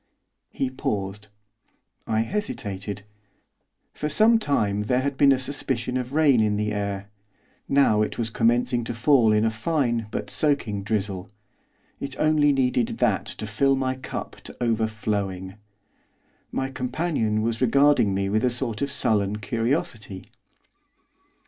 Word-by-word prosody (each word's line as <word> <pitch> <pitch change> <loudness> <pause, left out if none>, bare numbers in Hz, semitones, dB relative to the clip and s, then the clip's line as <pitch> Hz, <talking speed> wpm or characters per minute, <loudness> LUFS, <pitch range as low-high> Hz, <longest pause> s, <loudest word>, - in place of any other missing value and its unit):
He 130 -1 -2
paused. 105 -4 -3 0.8
I 110 0 +1
hesitated. 105 - -4 0.9
For 150 - -3
some 220 +8 +5
time 105 - 0
there 125 +4 +2
had 140 +1 -2
been 140 0 +5
a 135 - +4
suspicion 130 -2 -2
of 125 0 -2
rain 145 -5 +4
in 105 -1 +2
the 105 0 -1
air. 100 -1 -3 0.6
Now 135 -6 +4
it 105 - -1
was 115 -1 -2
commencing 120 +2 +2
to 120 - -4
fall 120 -2 +4
in 105 +1 +3
a 110 - +2
fine 120 -1 -1
but 105 -1 -4
soaking 120 -8 +1
drizzle. 100 -2 -3 0.7
It 140 -1 -6
only 155 -1 +4
needed 125 -3 +1
that - - +1
to - - -5
fill 135 +7 +2
my 130 -1 0
cup 130 - -6
to - - -9
overflowing. 105 -5 -1 1.0
My 135 0 -2
companion 130 -5 -1
was 115 +1 -2
regarding 130 -5 +4
me 95 0 0
with 110 +2 0
a 125 - +4
sort 120 -3 -3
of 140 0 -1
sullen 105 -7 +1
curiosity. 115 - -2
115 Hz, 140 wpm, -24 LUFS, 105-135 Hz, 1.0 s, some